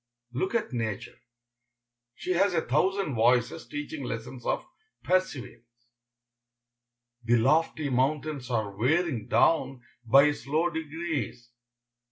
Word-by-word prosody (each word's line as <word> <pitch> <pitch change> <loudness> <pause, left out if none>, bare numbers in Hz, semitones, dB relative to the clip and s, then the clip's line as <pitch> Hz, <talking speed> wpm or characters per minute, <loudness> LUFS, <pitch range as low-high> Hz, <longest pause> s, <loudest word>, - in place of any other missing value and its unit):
Look 190 - -1
at 215 - -1
nature. 110 -4 -4 1.0
She 185 - -4
has 185 +1 +2
a 160 - +1
thousand 195 -5 +1
voices 120 +1 +2
teaching 145 0 -5
lessons 120 +1 -6
of - - 0 0.4
perseverance. 120 -9 -2 1.3
The 120 +1 +3
lofty 150 +5 +2
mountains 135 +1 0
are 110 -5 -1
wearing 135 - +1
down 135 -6 +2 0.2
by 140 +5 +6
slow 155 +4 -1
degrees. 155 -7 -4
135 Hz, 105 wpm, -28 LUFS, 120-160 Hz, 1.3 s, by